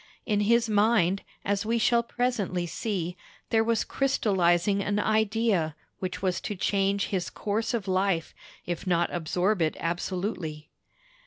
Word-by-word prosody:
In 210 -3 +1
his 230 +3 +3
mind, 205 -3 +3 0.2
as 200 0 0
we 230 +2 0
shall 235 +1 +3
presently 235 -7 -1
see, 180 -1 -3 0.4
there 225 -1 +4
was 230 0 +1
crystallizing 195 -7 +2
an 205 +1 -1
idea 215 -6 +1 0.2
which 185 0 -4
was 185 -1 0
to 210 - -4
change 195 +1 +1
his 185 -3 -1
course 220 +2 -2
of 210 -4 -3
life, 185 -3 0 0.3
if 175 +2 -4
not 175 -1 +1
absorb 180 +4 0
it 155 -1 +1
absolutely. 170 -3 -3
200 Hz, 140 wpm, -27 LUFS, 175-220 Hz, 0.4 s, there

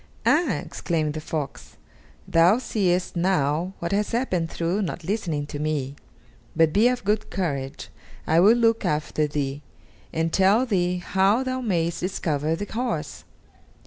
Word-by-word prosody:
"Ah!" 300 - +3
exclaimed 155 -1 -2
the 155 - -5
fox, 150 -3 -5 0.5
"thou 170 +6 +5
seest 185 -8 0
now 170 -1 +1
what 170 - -4
has 205 +3 0
happened 185 -9 0
through 175 +6 -1
not 175 -2 -4
listening 165 -6 -2
to 145 0 -7
me. 145 -3 -2 0.6
But 160 -1 +3
be 220 +4 +5
of 250 0 0
good 210 +1 0
courage; 140 -7 -3 0.4
I 160 +1 +3
will 210 +6 +6
look 230 -1 +2
after 150 0 0
thee, 145 -1 -3 0.5
and 165 0 -1
tell 200 +6 +4
thee 180 -6 0
how 195 +6 +2
thou 260 0 -2
mayest 170 -7 0
discover 160 -4 -1
the 205 - -4
horse. 220 - -4
175 Hz, 145 wpm, -24 LUFS, 155-210 Hz, 0.6 s, will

